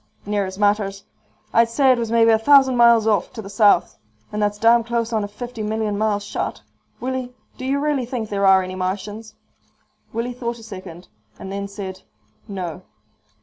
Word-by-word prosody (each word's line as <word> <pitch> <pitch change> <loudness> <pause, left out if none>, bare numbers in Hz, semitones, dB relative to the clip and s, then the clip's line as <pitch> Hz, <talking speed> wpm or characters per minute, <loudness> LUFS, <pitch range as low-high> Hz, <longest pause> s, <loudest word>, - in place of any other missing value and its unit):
"Near 205 -1 -1
as 190 0 -8
matters. 205 -1 +1 0.5
I'd 230 0 +4
say 265 +3 +4
it 250 - +2
was 230 -1 -3
maybe 230 -1 +5
a 220 - +4
thousand 265 +1 +5
miles 235 -2 +5
off, 210 -4 +1
to 220 - -6
the 195 - -9
south. 205 -3 +3 0.3
And 210 - -3
that's 205 0 0
damn 230 +2 +4
close 235 0 -2
on 215 -2 +1
a - - -3
fifty 235 +3 -7
million 215 0 -1
mile 210 0 +1
shot. 205 - -4 0.4
Willie, 255 -1 -4 0.2
do 255 - -5
you 270 +2 +1
really 285 -4 0
think 230 -4 -4
there 200 -1 +1
are 190 -1 +6
any 185 0 -6
Martians?" 205 +4 -4 0.8
Willie 235 +2 -3
thought 235 -1 -4
a 225 - -13
second 185 -5 -10 0.3
and 190 - -8
then 200 0 -4
said, 195 -2 -7 0.5
"No." 180 -4 -5
215 Hz, 190 wpm, -21 LUFS, 200-235 Hz, 0.8 s, are